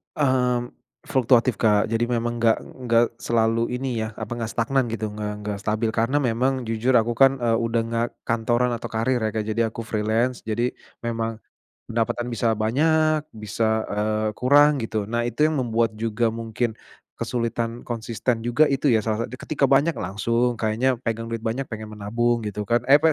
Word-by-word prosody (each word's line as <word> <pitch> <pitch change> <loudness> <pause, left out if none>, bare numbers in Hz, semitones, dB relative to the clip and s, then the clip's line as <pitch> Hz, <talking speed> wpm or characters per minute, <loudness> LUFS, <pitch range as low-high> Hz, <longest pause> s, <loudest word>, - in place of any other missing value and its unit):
Mmm, 125 -4 +1 0.3
fluktuatif, 125 -2 +3
Kak. 105 -1 +3
Jadi 115 +1 0
memang 120 0 -1
enggak 115 -1 +3
enggak 120 -2 +1
selalu 115 0 +1
ini 125 0 -2
ya, 110 - -4
apa, - - -6
enggak 115 -1 -4
stagnan 130 +4 +1
gitu, 110 -1 -2
nggak 105 0 -4
nggak 105 -1 -4
stabil 110 +1 0
karena 120 +6 +2
memang 125 0 0
jujur 115 +3 0
aku 115 +1 -1
kan, 135 +2 +6
eee, 115 -1 +2
udah 115 0 0
enggak 115 +1 0 0.2
kantoran 120 +1 +1
atau 115 - -6
karir 115 +3 +1
ya, 110 - +1
Kak. 110 -1 -2
Jadi 115 +2 0
aku 115 +1 -3
freelance. 110 +4 0
Jadi 120 +3 -1 0.2
memang 115 -1 -3 0.5
pendapatan 120 +1 -1
bisa 115 +1 0
banyak 155 +8 +2 0.2
bisa, 110 +1 0
eee, 105 +1 0
kurang 145 +2 +5
gitu. 110 -2 -2
Nah, 120 0 0
itu 120 - -7
yang 155 -2 +2
membuat 115 -2 +1
juga 115 0 0
mungkin 115 +1 -2 0.5
kesulitan 115 -1 -2
konsisten 115 0 -2
juga 120 +6 +3
itu 140 0 +1
ya 115 -2 +4
salah 110 -1 0
sa - - -2
dan 125 - -7
ketika 145 -2 +1
banyak 145 +4 +4
langsung, 115 +4 0
kayaknya 115 +4 +1
pegang 115 0 -2
duit 115 -1 -3
banyak 120 +5 -1
pengen 110 -1 -6
menabung 115 +3 0
gitu 105 +1 -4
kan, 120 +3 +2
eh, 140 - +9
apa 160 - -2
115 Hz, 180 wpm, -24 LUFS, 110-125 Hz, 0.5 s, eh